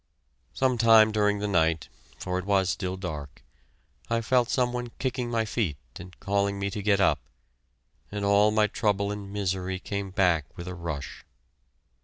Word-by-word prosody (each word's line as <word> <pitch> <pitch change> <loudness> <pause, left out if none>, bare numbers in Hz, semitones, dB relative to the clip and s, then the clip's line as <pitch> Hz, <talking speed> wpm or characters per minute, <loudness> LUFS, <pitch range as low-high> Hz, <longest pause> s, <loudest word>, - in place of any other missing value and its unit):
Some 130 -2 +1
time 110 -1 +7
during 105 -1 +2
the 105 +1 -2
night 80 -5 +1 0.3
for 90 0 -2
it 95 - -6
was 95 -2 +2
still 95 0 -3
dark 75 -7 -7 0.7
I 115 0 +1
felt 125 +1 +2
some 125 -1 +1
one 125 0 -3
kicking 125 -2 -2
my 115 -1 0
feet 105 - -1 0.2
and 90 +1 -12
calling 100 0 0
me 100 0 -2
to 105 - -4
get 100 -1 +2
up, 100 - +3 0.9
and 100 0 -3
all 100 +1 +5
my 105 0 +3
trouble 100 -2 0
and 100 -1 -6
misery 95 -2 -2
came 100 +1 -4
back 90 -4 +1
with 85 0 -7
a 90 - -4
rush. 85 -5 -6
100 Hz, 170 wpm, -27 LUFS, 90-110 Hz, 0.9 s, time